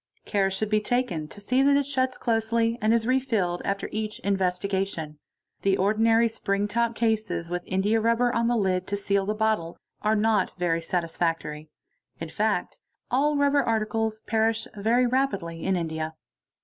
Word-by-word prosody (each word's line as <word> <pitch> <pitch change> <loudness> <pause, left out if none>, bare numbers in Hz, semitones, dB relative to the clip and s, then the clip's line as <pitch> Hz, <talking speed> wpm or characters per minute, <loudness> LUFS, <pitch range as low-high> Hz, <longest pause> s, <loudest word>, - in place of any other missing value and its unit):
Care 195 -2 +1
should 200 +3 -2
be 215 0 +3
taken 210 -10 -1
to 205 - -11
see 250 +6 +1
that 280 +1 +5
it 285 - +1
shuts 260 -2 0
closely 230 0 +1
and 215 - +3
is 230 -1 +2
re 255 +2 +3
filled 200 -9 -1
after 200 0 -2
each 215 0 -3
investiga 195 0 0
tion. 155 -5 -7 0.4
The 195 -1 +2
ordinary 225 +4 +3
spring 200 -2 -1
top 235 +2 0
cases 220 -7 -1
with 175 0 -2
indiarubber 225 +5 +2
on 230 0 +1
the 240 - +2
hd 185 -4 0
te 200 - -1
seal 200 -1 0
the 210 - 0
bottle 215 -6 0 0.2
are 215 +1 +2
not 210 -3 +1
very 170 -2 0
satisfactory. 165 -3 -2 0.5
In - - -5
fact - - -1 0.3
all 290 +4 +2
rubber 285 0 +3
articles" 220 -2 -1
perish 225 0 0
very 230 +5 +2
rapidly 200 -11 -1
in 190 - +1
India. 160 -2 -3
215 Hz, 165 wpm, -26 LUFS, 185-230 Hz, 0.5 s, that